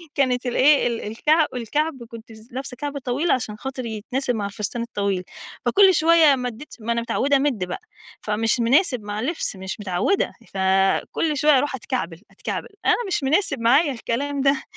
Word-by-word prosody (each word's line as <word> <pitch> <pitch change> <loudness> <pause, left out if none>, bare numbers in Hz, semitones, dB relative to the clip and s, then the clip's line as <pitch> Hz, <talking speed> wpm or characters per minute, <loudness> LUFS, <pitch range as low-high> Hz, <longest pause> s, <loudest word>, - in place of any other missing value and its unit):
كانت 255 -2 +1
الإيه 265 +2 +4
ال 235 -1 -2
الكع 300 +9 +2
الكعب، 265 +3 -2
كنت 230 0 -11
س 220 +1 -14
لابسة 265 0 -6
كعب 290 +1 -4
طويل 275 +5 -1
عشان 220 -4 -1
خاطر 260 +1 -5
يتناسب 245 +4 -2
مع 205 -2 -2
الفستان 210 +3 -4
الطويل، 200 -5 -2 0.4
فكُلّ 390 -1 +5
شويّة 320 -3 +5
مدّيت 250 +2 -6
ما 230 +1 -3
أنا 235 0 0
متعودة 275 +4 +1
أمدّ 270 -8 0
بقى، 180 0 -5 0.4
فمش 225 +3 0
مناسب 250 - +3
مع 205 0 -4
اللبس، 285 - -2
مش 190 +2 -6
متعودة، 205 - 0 0.2
فكُلّ 195 +10 +1
شويّة 300 0 +5
أروح 290 +1 0
أتكعبل، 175 -6 -4
أتكعبل، - - -5 0.2
أنا - - +5
مش 355 -7 -1
مناسب 280 - +1
معايا 270 +7 +4
الكلام 275 +4 -2
ده، 275 0 +2
250 Hz, 165 wpm, -22 LUFS, 220-285 Hz, 0.4 s, فكُلّ